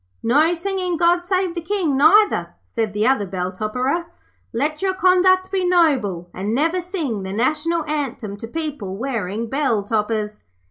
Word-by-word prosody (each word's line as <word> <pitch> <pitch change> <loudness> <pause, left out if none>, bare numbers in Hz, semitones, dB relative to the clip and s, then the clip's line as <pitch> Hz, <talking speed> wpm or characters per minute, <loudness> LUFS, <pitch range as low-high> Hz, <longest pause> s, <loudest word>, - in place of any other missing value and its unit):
"' - - -42
'No 300 +9 +3
singing 365 0 -2
"God 345 +1 +3
save 370 -1 0
the 340 - -4
King", 335 -5 0
neither,' 405 +10 +4
said 225 -3 -3
the 210 +1 0
other 250 -6 +2
bell 180 -1 -3
topperer. 250 - -2 0.5
'Let 300 +8 -1
your 380 -1 0
conduct 370 0 +3
be 385 -2 0
noble, 275 - +2
and 205 +5 -2
never 330 +6 +1
sing 325 - -3
the 190 0 -5
National 310 +8 0
Anthem 270 -9 -3
to 225 - -8
people 275 -10 -5
wearing 230 -4 -3
bell 265 -5 0
toppers.' 210 0 -2
290 Hz, 165 wpm, -21 LUFS, 215-350 Hz, 0.5 s, neither